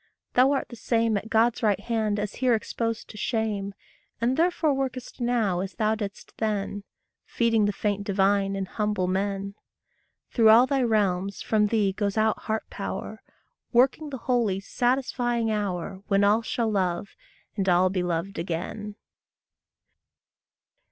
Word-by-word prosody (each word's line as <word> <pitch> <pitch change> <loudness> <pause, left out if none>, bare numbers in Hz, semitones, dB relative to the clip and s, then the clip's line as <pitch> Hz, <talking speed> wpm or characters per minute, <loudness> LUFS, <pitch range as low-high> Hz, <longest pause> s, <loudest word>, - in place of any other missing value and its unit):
Thou 255 +2 +5
art 275 - -2
the 240 - -9
same 230 -1 +1
At 205 +2 -3
God's 225 +1 +2
right 205 -4 +2
hand 215 -1 -1
as 205 0 -4
here 250 -2 +4
exposed 230 +1 -3
to 215 - -12
shame, 210 -3 -2 0.4
And 240 +3 +1
therefore 330 -2 +2
workest 260 -2 -4
now 230 -7 +1
as 190 +1 -4
thou 215 -1 +1
didst 205 -2 -6
then 205 -2 -2 0.4
Feeding 230 -3 +1
the 205 - +2
faint 205 0 -2
divine 195 0 +1
in 195 -1 -2
humble 210 -1 -1
men. 195 +1 -2 0.8
Through 225 -3 +5
all 230 +3 +8
thy 270 0 0
realms 200 -4 0
from 210 -1 +2
thee 205 -3 +1
goes 200 +1 -2
out 220 0 +2
heart 220 0 -3
power, - - -5 0.5
Working 265 +5 +3
the 270 - -5
holy, 230 -6 0
satisfying 240 +1 0
hour, 195 -2 -3
When 200 0 +3
all 210 +3 +4
shall 230 0 -1
love, 185 -1 -1 0.5
and 195 -3 0
all 180 +1 +4
be 185 -2 0
loved 175 +2 -2
again. 185 +5 -4
210 Hz, 150 wpm, -26 LUFS, 195-235 Hz, 0.8 s, all